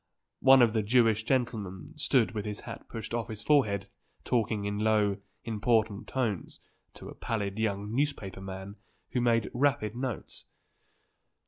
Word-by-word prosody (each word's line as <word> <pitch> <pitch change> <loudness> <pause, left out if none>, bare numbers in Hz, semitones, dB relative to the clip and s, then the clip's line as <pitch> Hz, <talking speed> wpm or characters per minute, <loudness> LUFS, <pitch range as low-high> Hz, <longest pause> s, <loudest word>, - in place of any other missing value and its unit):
One 135 -1 +7
of 115 -2 +3
the 110 - +2
Jewish 110 0 +3
gentlemen 115 -8 -2
stood 135 -5 +2
with 105 -2 -3
his 105 -1 -4
hat - - -9
pushed 115 0 -6
off 120 -1 -1
his 110 -1 -6
forehead 120 - +3 0.4
talking 110 -3 0
in 105 0 -2
low, 105 -2 +2 0.3
important 110 -2 +1
tones 115 -9 -2 0.4
to - - -10
a - - -8
pallid 105 -2 -3
young 105 -1 -1
newspaper 125 -9 -1
man 95 +1 -7 0.3
who 125 - 0
made 115 -2 +2
rapid 120 -5 +1
notes. 125 -3 -5
110 Hz, 145 wpm, -29 LUFS, 100-120 Hz, 0.4 s, One